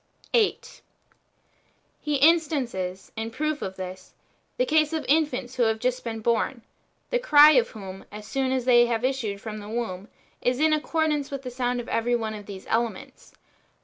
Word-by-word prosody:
o 475 - +6
8. 425 - -2 1.2
He 300 -1 -2
instances, 270 - +1
in 225 0 -3
proof 305 +4 -2
of 190 0 -4
this, 185 0 -8 0.4
the - - +2
case 310 -6 +2
of 315 - -2
infants 275 -5 0
wlio 240 -2 +3
have 220 0 +1
just 250 +2 -1
been 225 -1 -5
born, 235 +1 0 0.5
the - - +2
cry 300 -11 +8
of 250 -6 +3
whom, 195 -3 -9
as 210 0 -9
soon 265 +3 -1
as 260 -2 -1
they 240 -1 +6
have 235 0 -1
issued 240 -7 -2
from 215 0 -6
the 205 0 -9
womb, 215 -4 -4 0.3
is 250 +1 0
in 310 0 +4
accordance 305 -2 0
with 275 -1 -6
the 250 - -6
sound 245 0 -1
of 240 - -6
every 240 +1 +1
one 220 -2 -2
of 210 -1 -9
these 195 -2 -9
elements. 225 -3 -3
245 Hz, 180 wpm, -25 LUFS, 220-290 Hz, 1.2 s, cry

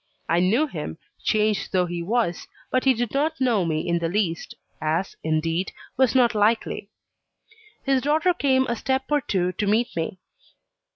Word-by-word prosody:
I 170 +1 +2
knew 215 - +3
him, 155 - -6 0.3
changed 215 -1 +1
though 180 -1 +2
he 175 0 -4
was; 195 -2 -1 0.2
but 255 +1 +1
he 265 -1 +5
did 235 -1 -2
not 310 +3 0
know 240 -7 +2
me 155 -1 -1
in 170 0 +1
the 165 -1 -1
least, 175 -3 -1 0.3
as, 160 +4 -1
indeed, 165 +3 0 0.2
was 260 -1 +3
not 240 -3 +5
likely. 210 -1 +1 0.9
His 270 -2 +2
daughter 310 +6 +2
came 265 -5 +2
a 235 - -1
step 265 +3 0
or 295 -1 +3
two 185 -6 0
to 205 +2 -2
meet 225 +4 +1
me. 165 +2 -3
210 Hz, 170 wpm, -24 LUFS, 175-260 Hz, 0.9 s, he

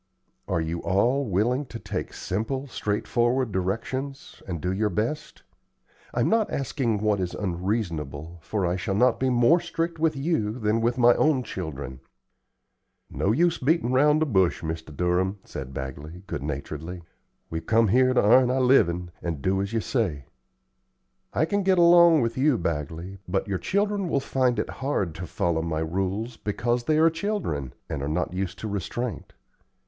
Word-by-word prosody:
"Are 85 - 0
you 80 +1 -3
all 120 +8 +1
willing 120 +8 +1
to 120 - -7
take - - -5
simple, 115 +8 -3
straightforward 120 +1 0
directions, 115 +9 -3
and 85 -3 -3
do 90 +4 -1
your 105 +2 +1
best? 110 - -3 0.7
I'm - - +1
not 225 -2 +2
asking 125 -6 -1
what 105 -2 +2
is 90 -2 -2
unreasonable, 85 - -3
for 100 +1 -2
I 90 +1 0
shall 95 +1 -2
not 125 +5 +3
be 130 - +1
more 125 +8 +4
strict 165 -1 -3
with 160 -1 +2
you 135 -7 0
than 110 -1 +1
with 120 +2 +1
my 120 -1 +6
own 150 -5 +2
children." 70 - -6 1.1
"No 100 - 0
use 170 +8 +2
o' - - -6
beatin' 160 -6 +2
around 150 +4 +4
the - - +1
bush, 95 - +2
Mr. 80 -2 -5
Durham," 90 +3 +1
said 65 -1 -7
Bagley, 70 +7 -7
good 85 - -4
naturedly; 75 +5 -5 0.5
"we've 80 0 -4
come 115 0 +4
here 130 +4 +4
to - - +4
'arn 125 +4 +6
our 130 +1 +1
livin', 90 -10 +3
and 85 -2 -2
to 70 +5 -2
do 95 0 +1
as 100 +1 -3
you 115 -1 0
say." 90 - -1 1.1
"I 155 - +2
can 205 +5 0
get 190 -1 +3
along 170 -2 +7
with 115 +1 -1
you, 140 -2 +3
Bagley, 85 +4 -4
but 95 +3 -1
your 95 -2 -1
children 200 -2 0
will 140 - +2
find 130 -2 +1
it - - -1
hard 115 - -1
to 85 +2 -7
follow 80 0 0
my 80 -1 -2
rules, 95 +8 -2
because 120 +3 -1
they 155 +2 +2
are 160 +1 +5
children, 165 - -3
and 70 - -4
are 70 - -2
not 85 +3 -1
used 95 -1 -3
to 110 - -3
restraint. 105 +4 -4
105 Hz, 175 wpm, -26 LUFS, 85-130 Hz, 1.1 s, along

